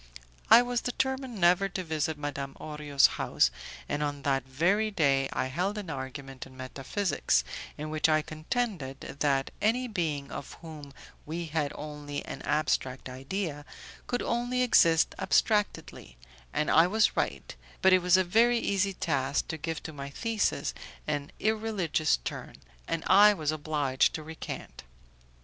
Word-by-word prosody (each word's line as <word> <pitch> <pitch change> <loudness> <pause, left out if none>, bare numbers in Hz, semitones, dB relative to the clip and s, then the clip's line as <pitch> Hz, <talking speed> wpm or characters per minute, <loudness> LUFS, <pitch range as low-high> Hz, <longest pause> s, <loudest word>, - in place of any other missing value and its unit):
I 240 - +9
was 245 0 -1
determined 265 -2 -2
never 180 +3 +4
to 185 0 -4
visit 160 -2 -2
Madame 140 -2 -5
Orio's 150 -2 +2 0.2
house, - - +2 0.4
and 145 0 -2
on 145 -1 -3
that 135 -2 +1
very 185 +11 +2
day 140 -8 +2
I - - -1
held 180 +10 -2
an 195 -6 -5
argument 135 -1 -7
in 130 -1 -16
metaphysics, 135 - 0 0.3
in 155 +1 -5
which 155 0 +2
I 155 0 +3
contended 155 - -3
that 140 -1 -1
any 245 +4 +2
being 160 - -2
of - - -7
whom 155 -4 -9 0.3
we 170 +3 -4
had 150 -2 -1
only 150 -1 -6
an - - -7
abstract 140 -3 -1
idea, 145 +4 -4 0.4
could 245 - -1
only 245 +1 0
exist 165 -9 +4
abstractedly, 210 - 0 0.3
and 150 - 0
I 165 +2 +6
was 215 +3 +2
right; - - -2 0.3
but 190 0 +7
it 185 - +6
was 180 +1 +5
a 185 - +4
very 230 +6 +4
easy 200 -3 0
task 140 -5 -1
to - - -2
give 160 +1 -4
to 160 - -7
my 140 -1 -6
thesis 215 -3 -1 0.3
an 145 -1 -3
irreligious 215 - +1
turn, - - -6 0.3
and 165 -1 -2
I 205 +2 +7
was 155 -4 -1
obliged 145 -4 +1
to 155 - -5
recant. 160 +1 -7
155 Hz, 150 wpm, -29 LUFS, 140-200 Hz, 0.4 s, I